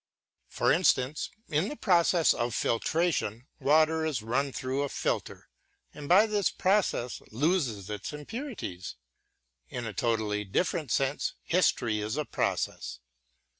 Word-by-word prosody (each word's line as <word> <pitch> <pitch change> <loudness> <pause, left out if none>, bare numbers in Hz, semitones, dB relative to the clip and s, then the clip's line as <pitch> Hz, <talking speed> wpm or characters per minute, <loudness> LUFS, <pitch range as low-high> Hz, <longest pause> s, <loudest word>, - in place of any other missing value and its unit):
For - - +1
instance, 130 +4 +2 0.2
in 155 +6 0
the 295 - -5
"process 175 - +4
of 120 0 -2
filtration" 125 - 0
water 155 +3 +3
is 145 -8 -1
run 135 +5 0
through 130 +2 -2
a 145 - -1
filter - - -3 0.5
and 145 -1 -8
by 195 +5 +7
this 210 -3 +1
process 185 - 0
loses 125 - 0
its 105 -1 -5
impurities. 150 - -6 0.7
In 120 - -5
a 105 - -4
totally 110 -2 0
different 145 - -1
sense 135 +4 0
history 125 -11 +2
is 110 +5 -3
a 150 - -1
process. - - -2
140 Hz, 130 wpm, -29 LUFS, 115-170 Hz, 0.7 s, by